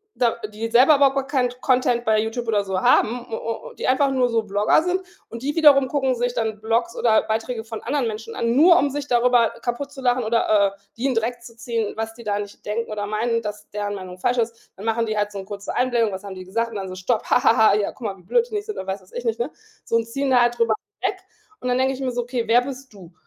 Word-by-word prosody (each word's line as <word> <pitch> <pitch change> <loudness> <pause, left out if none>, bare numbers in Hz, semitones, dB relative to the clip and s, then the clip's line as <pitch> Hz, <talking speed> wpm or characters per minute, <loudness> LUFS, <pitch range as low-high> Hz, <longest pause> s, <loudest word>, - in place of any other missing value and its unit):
da 235 -2 +2 0.2
die 225 +2 -4
selber 255 +6 +6
überhaupt 275 -1 +4
gar 270 -1 -1
keinen 260 -4 +1
Content 250 -2 +2
bei 220 -2 +3
Youtube 225 +2 -2
oder 210 -3 +1
so 190 -1 -2
haben, 240 +2 +3
u - - -1
u 230 - -5 0.2
und - - -18
die - - -2
einfach 270 +1 +3
nur 255 -2 +2
so 230 -2 0
Blogger 210 +8 +2
sind 360 +2 0 0.3
und 230 +2 -8
die 295 +3 -2
wiederum 285 -4 +6
gucken 265 -2 0
sich 245 0 -1
dann 220 -3 -2
Blogs 230 +2 0
oder 220 -2 +4
Beiträge 225 +1 -3
von 225 -1 -7
anderen 275 0 0
Menschen 225 +1 -6
an, 235 0 0
nur 335 +6 +7
um 290 -5 +2
sich 285 +1 -4
darüber 240 -2 +3
kaputtzulachen 255 -1 -1
oder, 215 -3 +2
äh, - - -30 0.2
die 245 - -3
in 265 - +1
Dreck 235 +2 -1
zu 235 -1 -13
ziehen, 230 -2 -3
was 225 0 -4
die 235 +1 -13
da 205 -1 0
nicht 205 -1 -8
denken 220 +2 -3
oder 205 -1 -3
meinen, 230 +2 0
dass 210 -1 -7
deren 205 0 -3
Meinung 185 -2 -8
falsch 245 +6 +1
ist. 230 0 -3
Dann 195 - -11
machen 225 +1 +1
die 215 -1 -2
halt 205 0 0
so 200 - -7
'ne 190 - -7
kurze 200 0 -6
Einblendung 240 -4 +1
„Was 190 +2 -7
haben 195 -1 -7
die 185 - -8
gesagt?“ 230 +5 -2
Und - - -9
dann 195 -2 -4
so 185 - -7
stopp 210 +5 -1
„Ha - - +4
ha 230 - +5
ha, 220 -3 +5
ja, 210 -1 -1
guck - - -23
mal, 195 -1 -5
wie 180 - -19
blöd 465 - +2
die 430 - -5
nicht 415 - -2
sind“, 430 - -5
oder 190 - -6
weiß 190 -1 -5
ich 245 - -5
nicht, 230 -2 -1
ne? 240 +5 -1 0.4
So, - - -1
und 230 -1 +2
ziehen 275 +3 -2
da 245 - +5
halt 240 0 +2
drüber 230 -1 +3 0.3
weg. 385 - -1 0.4
Und 250 - -2
dann 250 - +2
denke 265 +1 +2
ich 265 - -7
mir 255 -1 -1
so: 245 0 -2
„Okay, 245 -1 -2
wer 230 +2 +6
bist 265 0 -8
du? 180 -3 -14
230 Hz, 275 wpm, -22 LUFS, 215-255 Hz, 0.4 s, nur